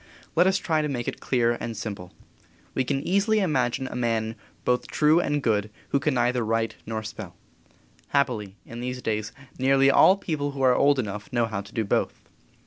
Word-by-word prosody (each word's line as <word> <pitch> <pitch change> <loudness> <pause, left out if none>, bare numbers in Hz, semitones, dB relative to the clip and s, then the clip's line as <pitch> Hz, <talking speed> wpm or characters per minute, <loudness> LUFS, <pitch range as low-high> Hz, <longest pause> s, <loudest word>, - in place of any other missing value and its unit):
Let 175 +3 +5
us 190 0 +3
try 160 -4 0
to 150 - -2
make 120 -4 -3
it - - -3
clear 120 -2 +1
and 115 -2 -5
simple. 100 -5 -6 0.6
We 130 - +1
can 135 +2 -2
easily 200 +4 +2
imagine 135 - +1
a - - -7
man 115 -2 -1 0.3
both 125 0 +1
true 155 +2 +3
and 145 -4 0
good 105 -2 +1 0.2
who 140 - +2
can 140 0 0
neither 125 0 +1
write 115 +1 0
nor 110 -1 -3
spell. 105 -4 -8 0.7
Happily, 115 -9 0
in 115 - -9
these 125 0 -4
days, 110 -1 -2 0.3
nearly 135 +1 +4
all 190 +7 +6
people 150 -7 -3
who 135 -1 -3
are 130 -1 +6
old 140 +2 +4
enough 105 -3 -4
know 120 -1 +2
how 105 -3 -3
to 100 - -14
do 110 - -1
both. - - 0
125 Hz, 195 wpm, -25 LUFS, 110-145 Hz, 0.7 s, all